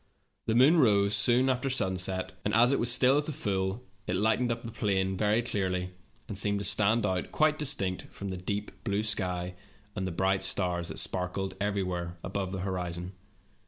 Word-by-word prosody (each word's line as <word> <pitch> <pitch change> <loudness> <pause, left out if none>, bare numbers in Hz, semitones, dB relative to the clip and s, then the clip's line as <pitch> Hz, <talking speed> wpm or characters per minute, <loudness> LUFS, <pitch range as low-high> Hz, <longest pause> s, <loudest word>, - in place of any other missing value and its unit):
The 110 - +1
moon 145 +8 +6
rose 100 -5 +4
soon 125 +1 +4
after 130 +1 0
sunset, 95 -6 -1
and 105 - 0
as 120 +3 +5
it 140 - +1
was 120 +1 +5
at 140 +4 +4
the 155 - -3
full, 95 -2 -2 0.2
it 90 - -1
lighted 110 +5 +2
up 115 - -4
the 115 - -6
plain 95 -3 0
very 105 +4 +1
clearly, 90 -5 -1 0.4
and - - -6
seemed 100 +1 +1
to 100 - -2
stand 105 +2 +3
out 95 -3 -2
quite 155 0 +2
distinct 115 -11 0
from 100 -1 -6
the 95 - -4
deep 100 +3 -4
blue 105 -2 -1
sky 90 -4 -1 0.4
and 95 - -2
the - - -3
bright 95 +3 +1
stars 90 -3 -1
that - - -6
sparkled 95 +1 -2
everywhere 90 -4 -2
above 95 -1 -3
the 95 -1 -4
horizon. 90 -2 -3
100 Hz, 185 wpm, -29 LUFS, 95-115 Hz, 0.4 s, moon